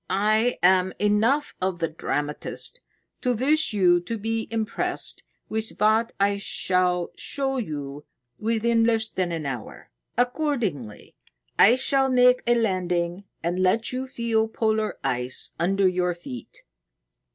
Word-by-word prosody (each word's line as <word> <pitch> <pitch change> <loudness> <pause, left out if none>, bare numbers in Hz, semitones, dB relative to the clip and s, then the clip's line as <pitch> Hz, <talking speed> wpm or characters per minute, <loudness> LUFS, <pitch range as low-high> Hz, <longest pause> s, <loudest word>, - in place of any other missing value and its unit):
"I 215 +4 +2
am 185 0 +4
enough 220 +8 +2
of 185 -1 -1
the 165 -1 0
dramatist 150 - -4 0.4
to 250 -2 +1
wish 295 +7 +2
you 180 -4 +4
to 200 +7 -5
be 225 +1 -2
impressed 225 -2 -2 0.3
with 220 0 -2
what 220 +2 +3
I 200 0 +2
shall 180 -3 0
show 270 -1 -2
you 145 - -5 0.3
within 230 +1 +1
less 225 -1 +1
than 180 -2 -1
an 165 -3 -3
hour. 125 -5 -7 0.3
Accordingly, 245 - -2 0.5
I 230 +5 +8
shall 270 +1 +2
make 250 0 +5
a 240 - +4
landing 180 -4 -1 0.2
and 175 +2 -1
let 210 +5 +2
you 260 +1 -3
feel 230 -3 0
polar 220 -1 -1
ice 125 +1 +1
under 195 +3 +2
your 180 -1 0
feet." 125 -9 -10
210 Hz, 130 wpm, -25 LUFS, 180-235 Hz, 0.5 s, I